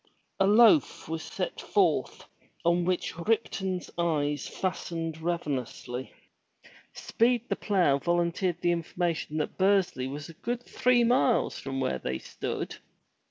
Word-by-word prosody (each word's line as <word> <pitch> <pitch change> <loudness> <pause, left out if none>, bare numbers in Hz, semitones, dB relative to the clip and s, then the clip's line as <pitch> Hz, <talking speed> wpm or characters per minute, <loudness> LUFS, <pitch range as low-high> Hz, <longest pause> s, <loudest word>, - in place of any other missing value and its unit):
A 195 - +4
loaf 235 +8 +5
was 160 0 -3
set - - -4
forth, - - +1 0.4
on 170 +1 +3
which 180 -1 -1
Ripton's 190 -2 -1
eyes 150 -4 0
fastened 165 -3 -3
ravenously. 135 -6 -3 0.8
Speed 240 +1 +1
the - - +1
Plow 180 -9 +2
volunteered 175 +2 0
the 175 - +2
information 170 -2 -2
that 150 - -3
Bursley 190 -9 +2
was 145 +2 -6
a 165 - -11
good 240 +8 -4
three 250 -1 +2
miles 245 0 +2
from 135 -1 -4
where 65 - -1
they 65 +1 -3
stood. - - -5
175 Hz, 125 wpm, -28 LUFS, 150-195 Hz, 0.8 s, loaf